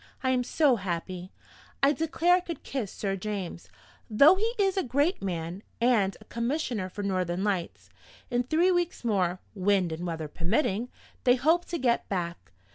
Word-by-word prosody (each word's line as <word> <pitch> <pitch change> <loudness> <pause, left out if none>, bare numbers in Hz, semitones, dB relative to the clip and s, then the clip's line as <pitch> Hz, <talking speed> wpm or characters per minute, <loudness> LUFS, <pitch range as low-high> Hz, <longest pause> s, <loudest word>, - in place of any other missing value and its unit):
I 260 - +2
am 250 -1 +2
so 275 -1 +3
happy, 180 -1 -4 0.5
I 275 - +6
declare 325 +4 +2
I 360 - +5
could 345 -2 -7
kiss 245 -8 -3
Sir 195 -2 -2
James 195 -3 -5 0.4
though 280 +10 +7
he 440 +5 0
is 390 -2 +2
a 385 - +2
great 285 +7 +1
man, 175 0 -4 0.2
and 230 -5 +2
a - - -16
Commissioner 235 -5 -2
for 205 +2 -6
Northern 185 -2 -1
Lights! 190 -5 -2 0.4
In 245 0 +2
three 320 +9 +2
weeks 350 -4 -1
more 185 -5 +1
(wind 190 -3 +1
and 170 +3 -4
weather 160 -2 -3
permitting) 200 - 0 0.3
they 245 -1 +5
hope 320 +7 +2
to 340 - -3
get 240 -4 +1
back. 170 - -4
215 Hz, 170 wpm, -28 LUFS, 185-290 Hz, 0.5 s, though